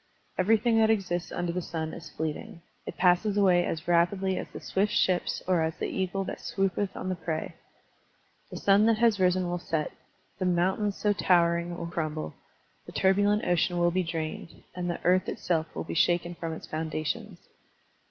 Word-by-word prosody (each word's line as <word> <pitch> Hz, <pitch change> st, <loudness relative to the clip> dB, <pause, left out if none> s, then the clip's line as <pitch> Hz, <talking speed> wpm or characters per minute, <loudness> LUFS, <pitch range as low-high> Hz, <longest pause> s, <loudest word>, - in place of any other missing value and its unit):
Everything 225 Hz, +4 st, +3 dB
that 220 Hz, 0 st, +4 dB
exists 180 Hz, -6 st, 0 dB
under 175 Hz, -1 st, -2 dB
the 180 Hz, -, -1 dB
sun 160 Hz, -2 st, -4 dB
is 165 Hz, -2 st, -9 dB
fleeting; 160 Hz, +2 st, -5 dB, 0.2 s
it -, -, -6 dB
passes 185 Hz, +3 st, +3 dB
away 185 Hz, -3 st, +4 dB
as 165 Hz, +1 st, -4 dB
rapidly 185 Hz, +3 st, +2 dB
as -, -, -4 dB
the -, -, -7 dB
swift 200 Hz, +2 st, 0 dB
ships 180 Hz, -2 st, +1 dB
or 180 Hz, -3 st, +3 dB
as 160 Hz, 0 st, -1 dB
the -, -, -2 dB
eagle 190 Hz, +1 st, -2 dB
that -, -, -6 dB
swoopeth 195 Hz, 0 st, -1 dB
on -, -, -4 dB
the 185 Hz, -, 0 dB
prey. 160 Hz, -2 st, -4 dB, 1.0 s
The -, -, -7 dB
sun 200 Hz, +2 st, +4 dB
that 225 Hz, -1 st, +4 dB
has 230 Hz, -3 st, +3 dB
risen 185 Hz, 0 st, +2 dB
will 175 Hz, 0 st, -2 dB
set, 160 Hz, -3 st, -2 dB, 0.5 s
the 185 Hz, -, 0 dB
mountains 190 Hz, +3 st, +1 dB
so 210 Hz, -1 st, +2 dB
towering 170 Hz, -2 st, +2 dB
will -, -, -4 dB
crumble, 155 Hz, -, -3 dB, 0.5 s
the -, -, -8 dB
turbulent 205 Hz, +3 st, +2 dB
ocean 175 Hz, 0 st, +1 dB
will 175 Hz, 0 st, +3 dB
be 185 Hz, +2 st, +1 dB
drained, 165 Hz, -1 st, -5 dB
and 180 Hz, -1 st, -3 dB
the 175 Hz, -, -2 dB
earth 185 Hz, +1 st, +3 dB
itself 160 Hz, -2 st, -1 dB
will -, -, -3 dB
be -, -, -6 dB
shaken 175 Hz, +1 st, +2 dB
from 165 Hz, -1 st, -5 dB
its 160 Hz, -, -8 dB
foundations. 155 Hz, -1 st, -3 dB
175 Hz, 180 wpm, -28 LUFS, 170-195 Hz, 1.0 s, that